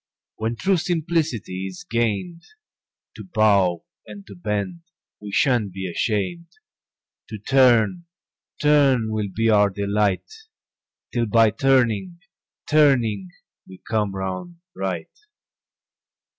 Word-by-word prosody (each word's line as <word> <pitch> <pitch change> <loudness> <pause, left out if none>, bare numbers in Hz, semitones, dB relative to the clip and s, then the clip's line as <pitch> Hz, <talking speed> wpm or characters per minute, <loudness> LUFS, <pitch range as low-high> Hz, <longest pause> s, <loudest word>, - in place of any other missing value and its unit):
When 110 +2 -2
true 190 +9 +1
simplicity 155 - -2
is 95 -1 -9
gain'd, 120 - -1 0.8
To - - -8
bow 100 - +2 0.2
and 100 -2 -11
to 100 - -11
bend 105 - -3 0.4
we 105 -1 -8
shan't 120 -3 +2
be 95 0 -5
asham'd, 110 - -2 0.8
To 110 - -6
turn, 130 - +3 0.5
turn 140 -7 +3
will 105 -2 -2
be 115 +4 0
our 105 -1 +4
delight 100 - -1 0.8
'Till 120 -2 0
by 115 +1 +4
turning, 130 - +1 0.5
turning 120 -11 +3 0.4
we 95 - -12
come 105 -3 -1
round 95 - -5 0.2
right. 95 -4 -4
110 Hz, 105 wpm, -22 LUFS, 100-135 Hz, 0.8 s, our